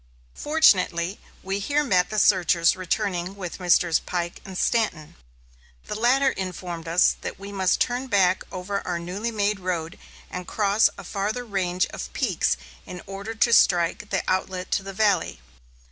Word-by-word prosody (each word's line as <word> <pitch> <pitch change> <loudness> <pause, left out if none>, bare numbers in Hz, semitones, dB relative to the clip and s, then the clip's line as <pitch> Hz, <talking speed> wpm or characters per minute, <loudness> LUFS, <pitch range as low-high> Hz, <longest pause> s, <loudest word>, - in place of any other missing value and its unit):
Fortunately, 195 - +2 0.2
we 195 +1 -2
here 290 +8 +1
met 185 -10 +2
the 215 - -4
searchers 175 -4 +4
returning 185 0 -2
with 185 -3 -7
Messrs. 175 -2 +3
Pike 175 -1 -4
and 190 -1 -8
Stanton. 180 -11 0 0.7
The - - -5
latter 255 +5 +3
informed 180 -3 -6
us 170 +2 +3
that - - -6
we 200 +1 -8
must 190 -2 +1
turn 250 +2 0
back 190 -5 +3
over 195 +2 -3
our 175 -1 -3
newly 185 +7 -4
made 210 -2 0
road 180 -2 -4 0.3
and 180 -1 -6
cross 205 0 +3
a 200 - -9
farther 205 +6 -3
range 185 -3 0
of - - -7
peaks - - 0 0.3
in 180 -1 -8
order 200 +3 -6
to 230 +2 +3
strike 175 +1 +3
the 195 - -1
outlet 185 0 -2
to - - +1
the 195 0 -7
valley. 205 - +1
190 Hz, 160 wpm, -24 LUFS, 180-210 Hz, 0.7 s, searchers